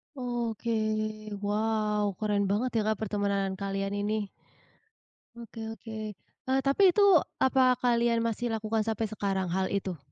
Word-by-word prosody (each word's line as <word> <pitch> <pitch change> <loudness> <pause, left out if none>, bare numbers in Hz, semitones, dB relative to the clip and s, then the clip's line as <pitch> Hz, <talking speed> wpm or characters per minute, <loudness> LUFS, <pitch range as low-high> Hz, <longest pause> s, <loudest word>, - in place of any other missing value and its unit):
Oke, 240 -3 -3 0.7
wow 210 0 0 0.2
keren 205 -2 +1
banget 215 +6 +1
ya 220 - +3
Kak 220 - +1
pertemanan 200 -2 0
kalian 195 0 -2
ini. 210 0 -1 1.1
Oke 230 -1 -8
oke, 225 0 -10 0.6
eee, 265 +1 +3
tapi 280 +8 +3
itu 415 - +5 0.4
apa 260 -1 +4
kalian 235 -1 +2
masih 230 +1 -1
lakukan 220 0 0
sampai 225 0 0
sekarang 195 -3 -1
hal 190 +1 +1
itu? 190 -3 -2
220 Hz, 130 wpm, -29 LUFS, 200-235 Hz, 1.1 s, itu